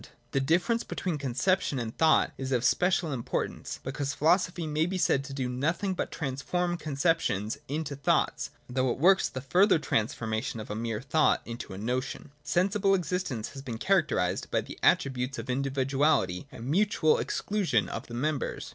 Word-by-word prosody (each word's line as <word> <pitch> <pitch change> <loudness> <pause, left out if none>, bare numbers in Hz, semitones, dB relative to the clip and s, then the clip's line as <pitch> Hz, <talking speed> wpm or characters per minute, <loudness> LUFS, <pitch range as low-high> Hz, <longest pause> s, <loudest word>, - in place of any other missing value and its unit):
\ 120 0 -38
The 135 - +1
difference 175 - +2
between 170 -5 -3
conception 140 +4 0
and 115 -2 -4
thought 160 -1 +4
is 135 0 -5
of 125 -2 +1
special 180 -3 +2
importance: 120 -3 -3
because 140 +1 -3
philosophy 175 +2 +2
may 155 +1 0
be 190 +1 -2
said 140 -6 +2
to 140 - -8
do 130 -2 -1
nothing 165 +10 -1
but 180 - -3
transform 175 +5 -2
conceptions 140 - 0
into 145 0 -3
thoughts, 140 - +1
— - - -36
though 130 +1 0
it 120 - -1
works 190 +6 +4
the 130 - -6
further 185 +8 +4
transformation 115 -2 -1
of 105 - -7
a - - -3
mere 115 -1 -3
thought 155 +4 +2
into 115 -4 -7
a - - -7
notion. 125 +6 -3
Sensible 195 +5 +2
existence 180 - -2
has 135 - -9
been 120 -5 -5
characterised 150 - +1
by - - +1
the - - -10
attributes 130 0 +2
of - - -4
individuality 135 - +1
and 115 - -9
mutual 160 +1 +2
exclusion 180 - 0
of - - -6
the 120 - -7
members. 140 +3 -2
140 Hz, 175 wpm, -29 LUFS, 125-175 Hz, -, thought